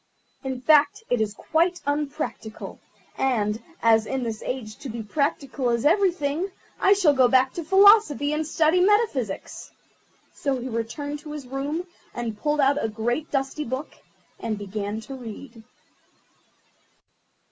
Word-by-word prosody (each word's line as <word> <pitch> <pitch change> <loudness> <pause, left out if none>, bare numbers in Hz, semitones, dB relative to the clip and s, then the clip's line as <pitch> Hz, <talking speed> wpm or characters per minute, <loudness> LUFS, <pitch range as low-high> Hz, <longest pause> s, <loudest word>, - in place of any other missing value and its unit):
In 260 -2 -3
fact, 295 - +4
it 245 -2 +2
is 210 -1 -1
quite 340 - +1
unpractical, 285 -6 -4 0.4
and, 220 -4 0 0.2
as 225 -1 +4
in 265 -1 -2
this 225 -2 -4
age 225 -4 -5
to 275 - -8
be 230 0 -5
practical 275 +2 -1
is 235 +1 0
everything, 345 -1 +2 0.3
I 390 - +5
shall 370 -8 +4
go 260 -2 +5
back 260 +1 +3
to 340 - -4
Philosophy 385 -5 +5
and 305 +1 0
study 320 +2 +3
Metaphysics." 370 - 0 0.6
So 275 -4 -1
he 250 +2 -5
returned 270 +6 -4
to 300 0 -9
his 295 -3 -7
room 280 +7 -3 0.3
and 235 -2 -3
pulled 295 +7 0
out 280 +1 +3
a 225 - 0
great 240 +8 -2
dusty 275 +2 -1
book, 260 +3 -5 0.5
and 220 -2 -3
began 205 +1 -4
to 270 - -9
read. 235 -1 -9
270 Hz, 145 wpm, -25 LUFS, 230-300 Hz, 0.6 s, I